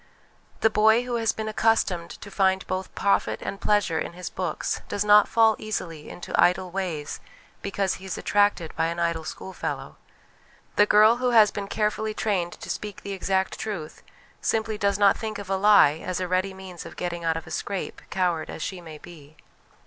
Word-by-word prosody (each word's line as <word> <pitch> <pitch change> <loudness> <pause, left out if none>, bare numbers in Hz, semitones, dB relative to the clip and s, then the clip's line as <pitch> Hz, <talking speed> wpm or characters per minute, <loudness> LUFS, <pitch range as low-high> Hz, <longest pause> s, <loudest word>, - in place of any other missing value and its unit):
The 220 - +4
boy 220 +3 +4
who 245 -1 -2
has 225 -1 +1
been 220 0 -5
accustomed 210 -6 +1
to 200 - -10
find 190 -1 +2
both 185 0 -4
profit 200 - +1
and 195 - -5
pleasure 205 -6 +2
in - - -4
his 180 +1 -7
books - - -3
does 205 - -1
not 210 0 +7
fall 225 -1 +4
easily 170 -8 -5
into 175 - -8
idle 180 0 +3
ways 170 -6 -4 0.4
because 200 -1 -1
he - - -10
is 190 - -4
attracted 205 -5 +1
by 165 0 +1
an 170 +1 -3
idle 170 -1 0
schoolfellow. 190 +4 -6 0.8
The 205 - +5
girl 215 +3 +6
who 250 0 +1
has 210 -2 +7
been 200 -1 -5
carefully 215 +1 -1
trained 180 -5 -1
to - - -10
speak 210 -2 -6
the 200 - -5
exact 190 0 -1
truth 180 -8 -5 0.4
simply 220 -1 0
does 200 -2 +1
not 200 -1 +4
think 215 -2 -4
of 200 -1 -7
a - - +3
lie 190 -6 +5
as 185 0 -3
a 185 - -2
ready 185 +1 0
means 185 -2 -9
of - - -10
getting 175 -1 -4
out 165 -1 +1
of 165 - -7
a - - -11
scrape, 200 -2 -4
coward 175 -4 0
as - - -6
she 185 -2 -5
may 160 -3 -10
be. 155 -2 -14
195 Hz, 195 wpm, -25 LUFS, 175-210 Hz, 0.8 s, not